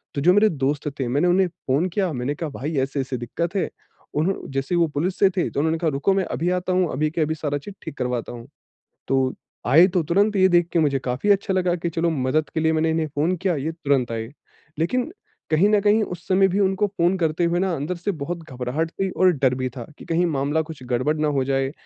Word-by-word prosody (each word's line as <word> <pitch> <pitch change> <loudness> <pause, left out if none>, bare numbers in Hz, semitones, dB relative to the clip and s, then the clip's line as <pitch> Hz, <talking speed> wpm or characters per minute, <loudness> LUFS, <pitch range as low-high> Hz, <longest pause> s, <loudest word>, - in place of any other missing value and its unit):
तो 140 - -1
जो 180 +5 +5
मेरे 210 +2 +5
दोस्त 145 0 -1
थे, 130 - -1
मैंने 145 +8 +1
उन्हें 185 +1 +3
फ़ोन 160 0 -1
किया, 185 -1 -1
मैंने 130 +3 -2
कहा 160 0 -4
भाई 145 +3 -4
ऐसे-ऐसे 135 -1 -3
दिक्कत 170 - -4
है। 190 - 0 0.5
उन्हों 170 +6 +1 0.2
जैसे 135 +5 -1
वो 170 -1 +3
पुलिस 160 +6 -2
से 195 - +6
थे 175 - +1
तो - - -3
उन्होंने 160 +2 +1
कहा 165 - +1
रुको 145 +7 +1
मैं 190 -1 +1
अभी 170 +2 -2
आता 185 +1 -2
हूँ, 180 -3 +2
अभी 150 +3 0
के 165 - -2
अभी 155 +1 0
सारा 145 -2 -2
चीज़ 190 +8 -10
ठीक - - -7
करवाता 125 -2 -2
हूँ। 120 0 -10 0.6
तो 135 -1 +2 0.3
आए 160 +9 +7
तो 180 -3 0
तुरंत 200 +7 +2
ये 190 -1 +5
देख 175 -1 +4
के 170 - +3
मुझे 140 -4 +2
काफ़ी 125 +11 -2
अच्छा 200 0 +2
लगा 180 -2 +1
कि 170 0 -3
चलो 170 +1 0
मदद 150 0 0
के - - 0
लिए 160 0 +2
मैंने 160 0 +1
इन्हें 160 -1 0
फ़ोन 160 +6 +1
किया 185 -1 0
ये 150 +3 -2
तुरंत 140 -7 0
आए। 115 +2 -4 0.5
लेकिन 250 - 0 0.4
कहीं 160 +6 +4
न 210 -1 +4
कहीं 210 +2 +4
उस 180 -4 -7
समय 190 +1 +4
भी 190 +2 -1
उनको 195 +1 +2
फ़ोन 185 -1 +1
करते 165 0 +1
हुए 170 +1 +1
ना 190 -1 0
अंदर 155 +5 -3
से 180 +4 -2
बहुत 170 +2 -4
घबराहट 130 +6 -2
थी 195 +1 -2
और 185 0 +4
डर 130 -4 +1
भी 130 0 -2
था 120 - -5
कि - - -12
कहीं 170 +2 +1
मामला 145 0 0
कुछ 140 -5 -11
गड़बड़ 130 +6 +1
ना 155 0 +1
हो 130 - +1
जाए 135 0 0
160 Hz, 245 wpm, -23 LUFS, 140-180 Hz, 0.6 s, आए